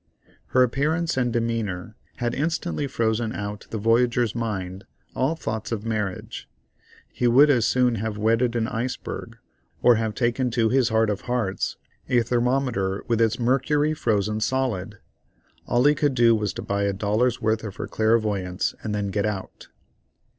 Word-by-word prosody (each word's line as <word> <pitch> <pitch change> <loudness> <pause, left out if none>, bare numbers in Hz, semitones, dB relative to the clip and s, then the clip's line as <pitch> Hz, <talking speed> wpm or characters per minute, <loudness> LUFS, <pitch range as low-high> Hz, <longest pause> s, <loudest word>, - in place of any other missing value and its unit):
Her 130 - +4
appearance 155 +7 0
and 125 -2 +1
demeanor 115 -4 -2 0.2
had 120 -1 -2
instantly 160 0 -1
frozen 115 -3 -1
out 105 0 -5
of - - -30
the 110 - -4
voyager's 115 +1 +2
mind 95 -5 -4 0.3
all 135 +6 0
thoughts 110 -8 -4
of 110 -1 -3
marriage; 105 -4 -4 0.6
he 125 - -1
would 140 +5 +6
as 120 -5 +3
soon 125 -1 +3
have 110 -2 -3
wedded 115 +3 +2
an 115 -1 0
iceberg, 125 +1 -4 0.5
or 120 -2 +6
have 110 -1 -2
taken 125 +1 0
to 115 -1 +3
his 125 -1 +3
heart 110 -1 +2
of 100 - -3
hearts 120 -6 -1 0.3
a 120 -1 +3
thermometer 120 -5 0
with 115 -1 +1
its 115 0 +2
mercury 140 +5 +1
frozen 105 -6 0
solid. 110 -4 -1 0.7
All 120 +2 +2
he 145 - +6
could 145 -2 0
do 120 -2 +5
was 105 -2 -1
to - - -6
buy 100 0 -1
a 100 - 0
dollar's 105 +5 +1
worth 110 0 0
of 105 -3 -6
her - - -4
clairvoyance 105 -5 0
and 105 -1 -3
then 100 -1 -2
get 100 +1 0
out. 100 -3 -6
115 Hz, 165 wpm, -24 LUFS, 105-125 Hz, 0.7 s, would